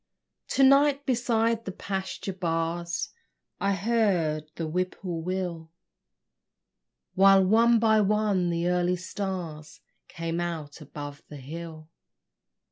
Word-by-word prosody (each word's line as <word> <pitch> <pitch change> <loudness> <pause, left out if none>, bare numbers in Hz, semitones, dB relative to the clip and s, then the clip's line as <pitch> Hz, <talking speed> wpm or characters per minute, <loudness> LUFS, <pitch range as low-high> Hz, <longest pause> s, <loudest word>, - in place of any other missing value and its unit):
To 270 - +2
night 280 +1 +5
beside 230 -2 +1
the 190 - -4
pasture 190 0 -4
bars 170 -1 -2 0.5
I 200 0 +1
heard 190 -8 +1
the 165 - -3
whippoorwill, 175 0 -3 1.4
While, 195 0 +6
one 230 +4 +5
by 220 -1 +4
one, 205 -3 +1
the 170 0 -1
early 180 0 +2
stars 180 -4 -5 0.3
Came 165 0 -4
out 165 -3 -5
above 145 0 -8
the 150 - -8
hill. 155 +3 -8
180 Hz, 105 wpm, -27 LUFS, 165-210 Hz, 1.4 s, While